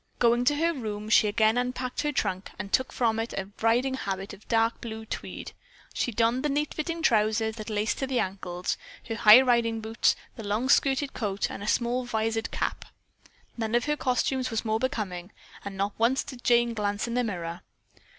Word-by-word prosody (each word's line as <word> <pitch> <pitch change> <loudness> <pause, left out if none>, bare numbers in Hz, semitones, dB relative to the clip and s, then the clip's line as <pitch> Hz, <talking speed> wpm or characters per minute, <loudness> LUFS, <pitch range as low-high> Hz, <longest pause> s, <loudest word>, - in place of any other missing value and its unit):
Going 240 +1 +3
to 290 - +4
her 335 +3 +1
room, 215 -6 -5
she 215 - +5
again 220 +2 +3
unpacked 250 0 -2
her 295 0 0
trunk 195 -8 -2
and 195 +1 -7
took 260 - +2
from 225 -2 +1
it 225 +1 -3
a 195 +1 -4
riding 240 +4 +2
habit 195 -5 -4
of 205 +1 -14
dark 225 0 +1
blue 220 -2 -6
tweed. - - -6 0.4
She 245 - -1
donned 230 +3 +2
the 300 - +1
neat 295 +2 -1
fitting 330 +2 -3
trousers 220 -2 +2
that 215 0 -6
laced 210 +1 -1
to 270 - -1
the 260 -2 0
ankles, 180 -2 -3 0.3
her - - -1
high 220 +2 +8
riding 235 -3 +2
boots, 220 +1 +1 0.2
the 225 - -6
long 215 +5 -1
skirted 275 0 +3
coat 200 -4 -2
and - - -7
a 205 - -5
small 240 +3 +1
visored 225 -1 -1
cap. - - -3 0.7
None 225 0 -1
of 240 - +2
her 295 0 +1
costumes 255 -1 0
was 225 -1 -2
more 220 0 +1
becoming, 205 -8 -3 0.3
but 200 - -6
not 200 +1 -2
once 245 +4 +3
did 250 -3 -10
Jane 240 -1 +3
glance 205 0 -1
in 235 - -3
the 250 +1 +1
mirror. 175 -6 -4
225 Hz, 200 wpm, -27 LUFS, 210-250 Hz, 0.7 s, high